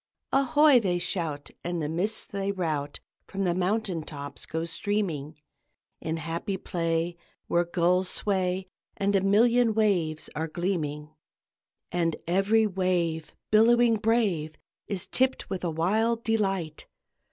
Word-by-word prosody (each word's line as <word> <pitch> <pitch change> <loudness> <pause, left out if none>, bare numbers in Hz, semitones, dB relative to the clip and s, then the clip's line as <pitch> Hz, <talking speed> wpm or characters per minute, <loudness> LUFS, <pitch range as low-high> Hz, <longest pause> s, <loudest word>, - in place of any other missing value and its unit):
"Ahoy!" 275 0 +5
they 185 -5 0
shout 165 -5 -3
and 175 0 -2
the 150 - -1
mists 185 +8 0
they 200 0 -2
rout 155 -7 -2 0.3
From 195 0 -3
the 175 -2 +2
mountain 185 -1 0
tops 145 -2 -8
go 160 +1 -2
streaming 165 -5 -2 0.6
In 160 +1 -2
happy 165 +4 -3
play 165 -1 -1 0.3
where 175 - +2
the 170 - -15
gulls 180 +2 +2
sway, 190 -2 0 0.3
And 200 0 +1
a 195 - +4
million 225 +3 +4
waves 175 -8 +1
are 160 +2 -2
gleaming! 155 -4 -3 0.8
And 170 -2 0
every 195 +6 +3
wave, 175 -5 -1 0.2
billowing 230 +1 +5
brave, 205 -9 +1 0.3
Is 195 -4 -2
tipped 260 -3 0
with 190 -1 -3
a 175 - 0
wild 220 +8 +1
delight. 195 -8 -1
180 Hz, 130 wpm, -27 LUFS, 165-210 Hz, 0.8 s, Ahoy